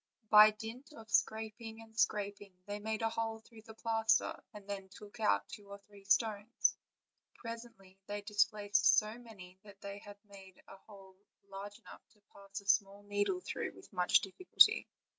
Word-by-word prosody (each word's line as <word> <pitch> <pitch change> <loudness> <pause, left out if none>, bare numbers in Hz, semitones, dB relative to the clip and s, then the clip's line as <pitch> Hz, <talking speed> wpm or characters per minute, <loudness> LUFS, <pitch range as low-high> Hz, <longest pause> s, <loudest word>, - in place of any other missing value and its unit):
By 215 0 +10
dint 225 +7 -8
of 225 -6 -13
scraping 220 0 -1
and 225 -1 -15
scrap 205 -2 0
ing 200 -2 -14
they 205 0 -5
made 220 +1 -3
a 225 - +2
hole 225 0 -2
through 225 0 -16
the 220 - -11
plaster, 225 -1 +1
and 205 -2 -12
then 195 -1 -6
took 210 +4 -13
out 100 - +2
two 205 -1 -11
or 200 - -8
three 200 0 -19
stones. 215 +2 +2 0.6
Presently 230 -5 -10
they 205 - -4
had 205 0 -6
displaced 205 -1 +3
so 215 +2 0
many 190 -6 -13
that 200 -1 -15
they 200 0 -7
had 205 0 -12
made 195 -2 -15
a 195 - -12
hole 195 -3 -14 0.3
large 200 +1 -8
enough 235 - -14
to 210 - -30
pass 200 0 -8
a - - -22
small 200 0 +2
needle 205 - -1
through - - -4
with 375 - -16
much 180 -1 +4
difficulty. 200 - +4
205 Hz, 180 wpm, -34 LUFS, 200-225 Hz, 0.6 s, By